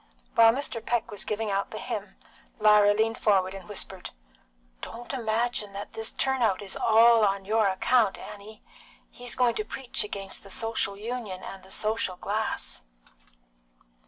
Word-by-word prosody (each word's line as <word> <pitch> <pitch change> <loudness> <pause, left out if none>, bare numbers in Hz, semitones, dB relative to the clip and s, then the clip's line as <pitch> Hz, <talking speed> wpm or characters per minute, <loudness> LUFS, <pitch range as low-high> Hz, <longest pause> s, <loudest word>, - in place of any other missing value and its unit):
While 225 -1 +7
Mr. 250 -4 -3
Peck 240 -1 -1
was 205 0 -3
giving 215 0 -2
out 195 0 -1
the - - -7
hymn, - - -5 0.4
Lyra 210 -1 +6
leaned 225 +1 +1
forward 190 -3 +2
and 195 -1 -10
whispered 190 -2 -5 0.7
"Don't 240 +3 -7
imagine 225 -3 0
that 200 +1 -7
this 225 0 -3
turnout 250 -8 +1
is 195 - -4
all 230 0 +6
on 195 -1 +1
your 215 +1 +3
account, 200 +3 +2
Annie. 210 +1 -11 0.5
He's 245 0 -3
going 245 -2 +3
to 215 - -2
preach 245 +3 -3
against 195 -2 -5
the 195 - -14
Social 220 -2 -2
Union 215 -4 -5
and 195 - -8
the 190 - -17
social 215 -2 -1
glass." 215 +4 -3
215 Hz, 155 wpm, -27 LUFS, 200-230 Hz, 0.7 s, While